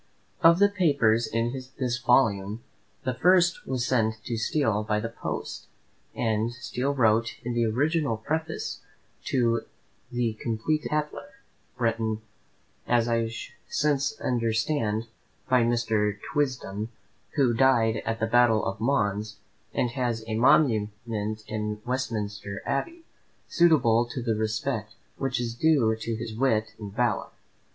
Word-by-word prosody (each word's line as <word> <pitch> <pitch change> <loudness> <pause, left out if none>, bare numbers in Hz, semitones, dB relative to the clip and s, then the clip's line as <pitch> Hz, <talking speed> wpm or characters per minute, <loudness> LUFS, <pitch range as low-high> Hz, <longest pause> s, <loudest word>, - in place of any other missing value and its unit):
Of 170 +1 +7
the 200 +2 +6
papers 140 - +2
in 115 +2 -1 0.2
this 125 -2 -1
volume, 110 -4 +2 0.4
the 130 -3 -1
first 175 +4 +3
was 130 -2 -1
sent 110 -4 +1
to 120 - -3
Steele 110 -2 +1
by 105 0 0
the 115 +2 -3
post, 115 - -5 0.5
and 110 0 0
Steele 125 +3 -3
wrote 115 -2 +2
in 120 +1 -2
the 120 0 +2
original 145 +1 +1
Preface 160 +7 -3 0.5
to 115 -3 +2 0.5
the 120 -2 0
completed 120 +8 -1
"Tatler" 150 - -2 0.5
"written, 115 -2 -1 0.6
as 120 -1 +3
I 115 -1 +1 0.4
since 145 -1 0
understand, 115 -1 0 0.4
by 130 -1 +4
Mr. 115 -3 +1 0.2
Twisdon, 120 -7 -1 0.5
who 135 -5 +3
died 115 -3 +3
at 115 0 -2
the 110 - +1
battle 115 -1 +4
of 100 +2 -3
Mons, 105 -5 0 0.4
and 120 0 0
has 120 -3 -2
a 110 - -4
monument 115 -2 +4 0.6
in 105 -1 -3
Westminster 105 -6 -3
Abbey, 330 - -2 0.4
suitable 125 - +4
to 120 - -5
the 115 -2 +1
respect 110 +1 -2 0.2
which 135 -3 -1
is 120 -1 -2
due 125 -4 +3
to 115 +1 -3
his 115 0 -5
wit 110 -3 +1
and 105 -2 -7
valour." 115 +1 0
115 Hz, 130 wpm, -27 LUFS, 110-135 Hz, 0.6 s, Of